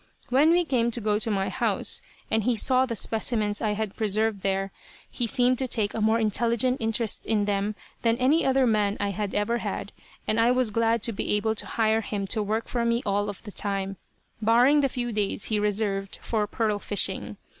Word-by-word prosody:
When 275 +5 +4
we 350 +1 +3
came 245 -5 +1
to 235 - -1
go 210 -1 0
to 225 - 0
my 195 -2 0
house, - - 0 0.3
and 220 -1 +2
he 245 +2 +1
saw 255 +4 +3
the 230 - -3
specimens 215 -1 0
I 215 -2 0
had 210 -1 -4
preserved 215 -1 0
there, 195 0 -1 0.4
he 240 - -1
seemed 250 +2 +2
to 260 - 0
take 215 -4 0
a 220 - -3
more 220 +1 +3
intelligent 235 +3 +1
interest 225 -1 -1
in 210 -2 +1
them 205 +1 -1 0.3
than 230 0 +2
any 275 +6 +3
other 265 0 +3
man 210 -3 +1
I 205 - 0
had 205 0 -4
ever 220 +3 0
had, - - -4 0.4
and 215 - +1
I 230 +1 +4
was 250 -3 +1
glad 230 0 +1
to 230 - +1
be 200 - -2
able 215 +1 +1
to 220 - -6
hire 220 0 +1
him 200 -2 -3
to 215 - -1
work 215 +2 -2
for 240 -1 -1
me 235 +1 0
all 205 0 0
of 205 - -8
the 210 - -8
time, 195 -1 -2 0.4
barring 240 +7 +4
the 275 -1 +2
few 240 -1 -3
days 205 -2 -1
he 215 -1 0
reserved 205 -1 -1
for 215 -2 -1
pearl 210 -1 -1
fishing. 205 0 0
220 Hz, 210 wpm, -26 LUFS, 205-235 Hz, 0.4 s, When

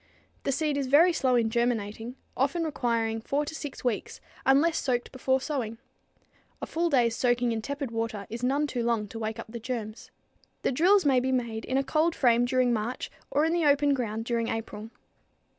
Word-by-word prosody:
The 275 - +1
seed 295 +1 0
is 275 -2 -1
very 325 +7 +6
slow 260 -5 +2
in 225 -2 +2
germinating, 235 0 -1 0.2
often 285 +6 +1
requiring 230 -7 -1
four 285 +6 -1
to 305 - -6
six 290 -3 -7
weeks 245 -4 -2 0.3
unless 295 +5 +4
soaked 245 -3 -1
before 260 0 +1
sowing. 255 -6 -3 0.8
A - - -4
full 340 +1 0
day's 240 -6 +3
soaking 245 -1 +1
in 225 -1 -2
tepid 280 0 -4
water 225 -3 -3
is 230 +2 -6
none 275 +4 +1
too 255 -4 -3
long 230 -3 0
to 225 - -7
wake 220 -1 -3
up - - -8
the 235 - -6
germs. 225 -2 -5 0.5
The - - +2
drills 360 +8 +4
may 265 -3 +4
be 260 +1 -1
made 235 -3 -2
in 260 - 0
a 275 - +2
cold 315 +4 +1
frame 240 -2 +4
during 250 -1 +2
March 230 +3 -3 0.2
or 295 +2 +2
in 325 - +1
the 340 -2 +1
open 285 0 +4
ground 225 -4 -2
during 230 -1 0
April. 225 -1 -5
250 Hz, 195 wpm, -28 LUFS, 230-285 Hz, 0.8 s, very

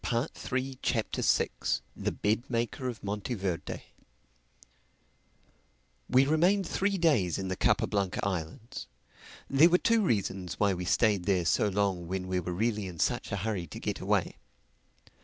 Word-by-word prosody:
THE 120 +5 0
SIXTH 130 +1 -3
CHAPTER 115 -3 -1 0.7
THE - - -2
BED 110 +5 -1
MAKER 120 +2 -1
OF 115 -3 -8
MONTEVERDE 100 -3 -3 2.3
WE 130 +2 +5
remained 175 +6 +3
three 200 0 0
days 125 - +2
in 95 -1 -3
the 95 - -1
Capa - - +2
Blanca 100 +1 -1
Islands. 90 +4 -5 0.6
There 145 +5 +6
were 180 - +5
two 230 +3 +3
reasons 95 - -1
why 100 -2 +3
we 90 0 -4
stayed 100 -2 +2
there 90 -3 +2
so 105 +5 +3
long 95 -3 0
when 95 +1 -3
we 95 0 0
were 90 0 -4
really 105 +2 -1
in 90 -2 -8
such - - 0
a - - 0
hurry 100 -6 -2
to - - -8
get - - -3
away. - - 0
105 Hz, 150 wpm, -30 LUFS, 95-130 Hz, 2.3 s, There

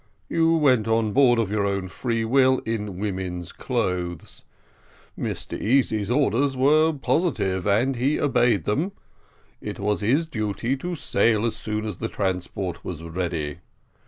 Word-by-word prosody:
You 165 0 +2
went 130 -8 +3
on 110 -2 +1
board 130 -3 +5
of 110 -4 0
your 105 -1 +1
own 100 -1 -2
free 115 +3 -2
will 130 +2 +4
in 105 -4 -3
woman's 95 -3 -4
clothes. 90 -3 -3 0.7
Mr - - -4
Easy's 110 -3 +1
orders 135 +1 +1
were 155 +4 +4
positive, 110 - 0
and 120 +7 +2
he 135 +5 +1
obeyed 120 - +2
them. 155 - -1 0.7
It - - -5
was 100 -2 -1
his 135 +11 +2
duty 110 -2 -2
to 175 +6 -4
sail 115 -7 +1
as 115 - -1
soon 110 0 -3
as 105 -5 -4
the 115 - -3
transport 90 -2 -3
was 85 -3 -6
ready. 85 -3 -3
110 Hz, 145 wpm, -24 LUFS, 95-135 Hz, 0.7 s, board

